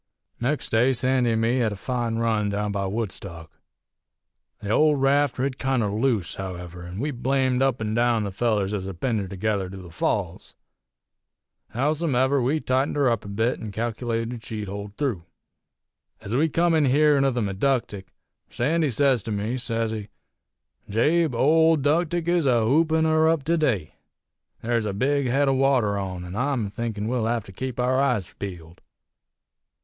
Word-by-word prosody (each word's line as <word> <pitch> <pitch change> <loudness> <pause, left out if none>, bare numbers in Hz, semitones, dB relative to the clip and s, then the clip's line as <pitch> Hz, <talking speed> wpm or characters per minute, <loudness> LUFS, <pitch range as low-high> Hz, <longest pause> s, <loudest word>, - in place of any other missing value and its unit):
"Nex' 140 +5 -1
day 120 +4 +3
Sandy 125 -1 +1
an' 110 - 0
me 115 +3 +2
hed 115 -3 +1
a - - -4
fine 120 +2 -2
run 110 -2 0
down 105 +1 -2
by 100 -1 -2
Woodstock. 95 -6 -5 1.1
The 105 -1 -4
old 150 +3 +4
raft 140 0 +2
rid 130 +1 -2
kinder 130 -6 0
loose, 110 -3 0
however, 90 -2 -7
an' 90 +2 -8
we 145 +4 -1
blamed 130 0 0
up 135 -2 +2
an' 110 -1 -2
down 120 -1 +2
the 100 - -3
fellers 105 -1 0
ez 95 -3 -3
had 95 -3 -7
pinned 120 -5 0
her 100 - -4
together 100 0 -2
to 95 - -9
the 90 -2 -11
Falls. 90 +1 -2 1.2
Howsumever, 140 -1 +1
we 140 +6 +1
tightened 130 0 0
her 140 -4 +3
up 115 - -1
a - - -10
bit, 110 +5 -1
an' 110 - -6
calc'lated 115 +1 -3
she'd 105 -2 -5
hold 100 +1 -7
through. 130 - -1 1.0
"Ez 100 - -7
we 155 +5 +2
come 170 +2 +2
in 155 -2 +3
hearin' 145 +1 +4
of 135 -2 +1
the 120 - 0
Meductic, 100 0 -1 0.4
Sandy 155 +5 0
sez 130 -1 +2
to 110 - -6
me, 105 +4 -2
sez 115 -2 -1
he: 105 -2 -5 0.8
'Jabe, 150 +7 +2
old 160 +2 +4
'Ductic 165 +3 +1
is 170 -4 +2
a 120 -3 +3
hoopin' 160 +5 +3
her 160 0 +3
up 160 -4 +1
to 165 +4 +1
day. 115 - 0 0.7
There's 115 -1 0
a 100 - -2
big 140 +6 +1
head 140 +3 +2
o' 135 - +3
water 130 -6 +2
on, 95 -3 -4
an' 90 +2 -7
I'm 125 -4 -1
thinkin' 110 -2 -3
we'll 120 -2 0
hev 115 -1 0
to 95 - -12
keep 125 +5 -5
our 130 +2 +2
eyes 125 -10 0
peeled. 85 -3 -8
120 Hz, 175 wpm, -24 LUFS, 105-135 Hz, 1.2 s, old